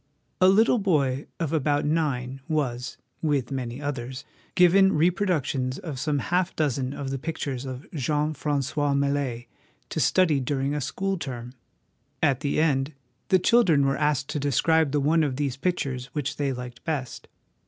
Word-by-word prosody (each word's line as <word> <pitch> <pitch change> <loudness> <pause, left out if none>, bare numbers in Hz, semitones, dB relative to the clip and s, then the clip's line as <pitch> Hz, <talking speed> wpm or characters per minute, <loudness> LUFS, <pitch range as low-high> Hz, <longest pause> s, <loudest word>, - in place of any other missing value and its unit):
A 185 - +7
little 220 +5 +5
boy 145 -8 +1
of 165 -2 -2
about 145 -1 +1
nine 135 -4 -1
was 125 -5 -2 0.2
(with 145 -6 0
many 125 -2 -4
others) 130 -3 -5 0.3
given 190 +2 +6
reproductions 155 -6 +1
of 150 -7 -6
some 150 +1 0
half 175 +6 0
dozen 135 -4 0
of 140 -1 -5
the 135 - -3
pictures 140 -4 -4
of 130 +1 -6
Jean 150 +1 0
Francois 145 0 0
Millet 140 -4 -1 0.4
to - - -3
study 165 -6 +3
during 135 +1 -1
a 150 - -2
school 195 +8 -2
term. 125 -4 -6 0.7
At 140 -4 +2
the 145 0 -1
end, 140 -2 +1 0.3
the 190 - +5
children 180 -7 +4
were 135 0 +2
asked 145 -2 0
to 150 - -2
describe 145 +2 +2
the 145 - +1
one 155 +4 +3
of 140 -4 -1
these 140 -2 -1
pictures 135 -5 -2
which 145 -2 -3
they 140 -2 0
liked 125 -1 -7
best. 145 -6 -4
145 Hz, 160 wpm, -26 LUFS, 130-160 Hz, 0.7 s, A